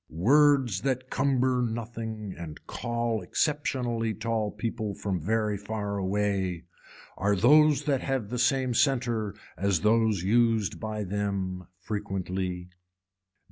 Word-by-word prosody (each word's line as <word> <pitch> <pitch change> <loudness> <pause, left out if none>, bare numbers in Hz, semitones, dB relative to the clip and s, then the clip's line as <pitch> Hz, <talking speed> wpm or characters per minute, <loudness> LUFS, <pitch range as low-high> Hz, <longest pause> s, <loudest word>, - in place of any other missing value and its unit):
Words 130 - +3
that 130 0 -2
cumber 130 -2 +2
nothing 110 -3 -4
and 80 -3 -9
call 115 -2 -2
exceptionally 120 - -1
tall 110 -1 -1
people 110 -1 -4
from 95 -4 -3
very 105 +3 0
far 100 -1 -3
away 95 -2 -1 0.5
are 100 +2 +2
those 150 +7 +5
that 140 -3 +1
have 130 -6 -2
the 125 +1 -3
same 130 0 +2
center 120 -5 +1 0.2
as 100 0 +1
those 110 -3 +2
used 115 0 +2
by 110 -1 -3
them 95 -2 -3
frequently. 95 -2 -4
110 Hz, 115 wpm, -28 LUFS, 100-120 Hz, 0.5 s, those